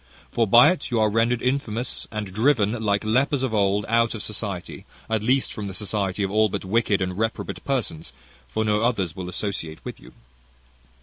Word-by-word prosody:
"For 115 -1 +1
by 120 - +7
it 185 - -3
you 120 -3 0
are 110 -1 +3
rendered 115 +2 +1
infamous, 125 -3 -2
and 110 -1 -3
driven, 110 -1 +3
like 100 -1 +1
lepers 130 +5 +1
of 130 -4 -1
old, 100 -1 +2
out 115 0 +2
of 105 - -5
society; 100 -4 -4 0.2
at 110 -1 0
least, 130 +4 +1
from 105 -2 -5
the 95 - -6
society 100 -2 -1
of 95 - -1
all 110 +1 +3
but - - -4
wicked 105 -1 +1
and 90 0 -3
reprobate 110 +3 -3
persons; 95 - -2 0.4
for 110 - -2
no 105 0 +2
others 100 -8 0
will 90 -2 -5
associate 90 -4 -3
with - - -7
you. - - -15
110 Hz, 190 wpm, -24 LUFS, 100-115 Hz, 0.4 s, by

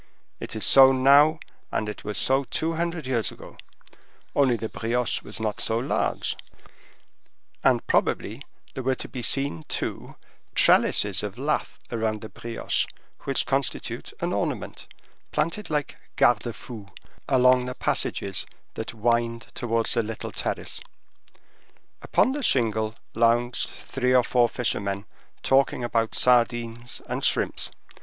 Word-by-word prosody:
It - - -6
is 110 - 0
so 135 -1 +9
now, 140 +4 +5 0.3
and 105 - -1
it 105 - -6
was 105 0 -4
so 135 +1 +2
two 160 +6 -1
hundred 170 -1 -2
years 120 -6 0
ago, - - -12 0.8
only 135 -4 +4
the 115 -1 -4
brioche 120 +2 -1
was 105 - -8
not 110 -2 -2
so 110 - 0
large, 125 +4 -1 1.3
and - - +3
probably 110 +6 0 0.3
there 130 - -4
were 130 +1 +1
to - - -6
be 125 - -6
seen 120 - +1
to - - -4 0.4
trellises 100 -2 +4
of 105 +1 -5
lath 145 +4 -2
around 110 -2 -1
the 110 - -8
brioche, 115 -1 -2 0.4
which - - +1
constitute - - -1
an - - -1
ornament, - - -3 0.4
planted 170 +7 -1
like 150 -2 -2 0.2
gardes 120 -2 +3
fous 110 -6 -10 0.4
along 125 -1 +5
the 125 - -5
passages - - -1 0.3
that - - -6
wind 115 +1 0
towards 115 -1 0
the 115 - +2
little 115 0 -5
terrace. - - -4 1.2
Upon 255 - +2
the 290 +2 -3
shingle 110 - +1 0.2
lounged 120 +1 +2
three 130 -1 -1
or 125 - +6
four 120 -1 +3
fishermen 100 -5 -2 0.4
talking 135 -2 +2
about 115 -1 0
sardines 120 -1 +1
and - - -4
shrimps. - - +1
120 Hz, 135 wpm, -25 LUFS, 115-135 Hz, 1.3 s, so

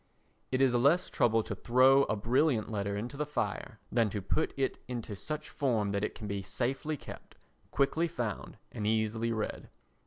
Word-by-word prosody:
It 130 0 +1
is 130 -2 +4
less 140 +9 +3
trouble 115 -1 +3
to - - -4
throw 130 +3 +5
a - - 0
brilliant 115 +2 +1
letter 100 -1 -1
into 120 +6 -5
the 150 - -1
fire 150 - -3
than 115 -2 +3
to 100 - -3
put 100 - 0
it 135 -1 0
into 120 -4 -4
such 150 +9 -5
form 115 -8 0
that 100 0 -1
it - - -2
can 110 - -7
be 100 -1 -2
safely 130 +10 -2
kept, - - -11 0.3
quickly 155 +5 +1
found 120 - -4
and 105 -1 -3
easily 110 +1 +1
read. 110 -2 -3
120 Hz, 180 wpm, -31 LUFS, 105-135 Hz, 0.3 s, throw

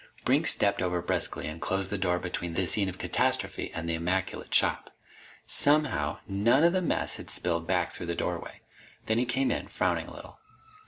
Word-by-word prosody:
Brink 145 +5 +3
stepped 100 -7 +3
over 90 -1 0
briskly 85 - -1
and 80 +1 -7
closed 95 0 -1
the 105 - -1
door 90 -2 +1
between 90 -1 -4
the 95 - +2
scene 100 +3 +3
of 90 - -8
catastrophe - - 0
and 85 0 -5
the 85 - 0
immaculate 90 +3 -2
shop. - - +2 0.6
Somehow, 150 0 +2
none 110 +9 +2
of 170 +1 +4
the 185 - +1
mess 170 - -1
had - - -9
spilled 85 -1 +1
back 90 -2 0
through 85 - -6
the 85 - -2
doorway. - - -4 0.4
Then 110 +1 +2
he 125 - +1
came 130 +2 0
in, - - -3
frowning - - -1
a - - -10
little. - - -12
95 Hz, 195 wpm, -28 LUFS, 85-125 Hz, 0.6 s, of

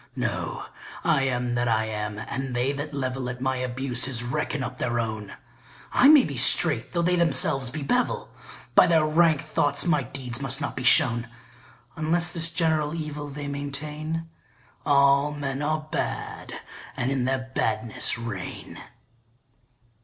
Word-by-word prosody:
No, - - -5 0.4
I 135 - +1
am 125 -2 -3
that 120 0 -2
I 110 -1 -1
am, 105 -1 -5
and 130 +4 -5
they 125 +3 0
that 145 +2 -5
level 130 -2 -3
At 125 0 -7
my 130 0 -3
abuses 125 -1 0
reckon 145 +2 -4
up 125 0 -8
their 120 -1 -3
own: 110 -3 -7 0.5
I 265 - +3
may 295 -3 +5
be - - -5
straight, - - +5
though 170 -1 -2
they 180 +1 +2
themselves 160 -6 +6
be 145 +3 -8
bevel; 250 - -3 0.4
By - - +4
their 160 -3 +1
rank 155 -1 +1
thoughts 145 -2 +2
my 155 -5 0
deeds 125 -1 -4
must 135 -2 +3
not - - -6
be - - -6
shown; 115 0 +6 0.7
Unless 170 +2 +5
this 165 -1 0
general 160 -2 -2
evil 150 -2 -7
they 145 +1 -7
maintain, 150 +3 -5 0.6
All 140 0 +2
men 140 -1 -3
are 155 +1 -3
bad, - - -5 0.5
and 125 - 0
in 130 -2 -2
their 130 0 -3
badness 110 0 -1
reign. 115 -6 -7
140 Hz, 155 wpm, -22 LUFS, 125-155 Hz, 0.7 s, themselves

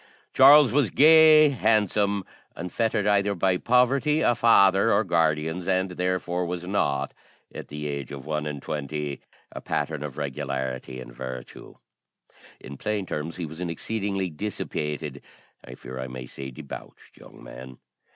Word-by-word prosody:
Charles 140 +1 +7
was 140 -3 +2
gay, 155 0 +7
handsome, 105 -5 +1 0.3
unfettered 105 +4 -1
either 100 -1 +2
by 95 0 +1
poverty, 135 - +2
a 120 - +3
father, 100 -3 +4
or 100 +2 +3
guardians, 80 -1 0
and 95 0 0
therefore 90 0 -2
was 90 0 -4
not, 70 -8 -1 0.4
at - - -8
the 75 0 -7
age 70 -3 -5
of 70 -1 -8
one 75 -1 -3
and 75 -2 -6
twenty, 75 -1 -4 0.3
a - - -8
pattern 75 0 -3
of 75 -2 -7
regularity 65 -2 -4
and - - -10
virtue. 65 0 -9 0.8
In 70 +1 -10
plain 105 +2 -2
terms, 80 -1 -5
he 90 - -4
was 80 +3 -9
an 90 - -3
exceedingly 95 +1 -3
dissipated 75 -5 -4 0.4
I 60 - -10
fear 65 +1 -9
I 65 - -4
may 65 0 -8
say 65 +2 -8
debauched, 70 +2 -11
young - - -15
man. 65 +2 -11
85 Hz, 150 wpm, -25 LUFS, 70-105 Hz, 0.8 s, Charles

